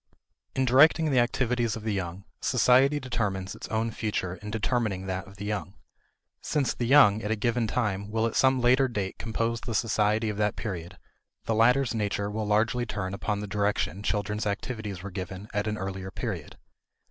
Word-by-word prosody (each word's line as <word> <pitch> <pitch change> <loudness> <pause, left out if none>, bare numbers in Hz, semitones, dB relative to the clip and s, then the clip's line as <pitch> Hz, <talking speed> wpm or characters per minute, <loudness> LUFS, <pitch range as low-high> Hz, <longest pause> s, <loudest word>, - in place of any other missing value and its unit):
In 130 - +2
directing 155 +5 +5
the 130 - +4
activities 120 -1 +1
of 110 - -7
the 110 -1 -1
young, 95 0 -4 0.2
society 135 +4 +4
determines 105 -8 -2
its - - -8
own 110 +1 -1
future 105 -5 -2
in 105 - -8
determining 105 -3 -1
that 95 0 -4
of 95 0 -14
the 100 - -6
young. 105 -2 -3 0.7
Since 145 -4 0
the 120 - -2
young 115 -6 +6
at 105 - -3
a 110 - +2
given 115 +2 0
time 100 -3 -1
will 110 +1 0
at 115 - -2
some 130 -1 +4
later 130 +2 +4
date 100 -6 -4
compose 115 +1 -2
the 115 - -4
society 110 0 +1
of 105 - -4
that 105 -1 +1
period, 90 -6 -5 0.5
the 115 - 0
latter's 125 +4 +3
nature 100 -2 -1
will 105 0 -3
largely 115 +3 +1
turn 95 -3 -3
upon 105 0 -2
the 105 - -5
direction 100 -3 -1
children's 105 +1 -1
activities 105 -2 -4
were 100 - -6
given 95 +2 -6
at 105 +1 -1
an 105 0 -1
earlier 95 -1 -5
period. - - -5
105 Hz, 185 wpm, -27 LUFS, 100-120 Hz, 0.7 s, young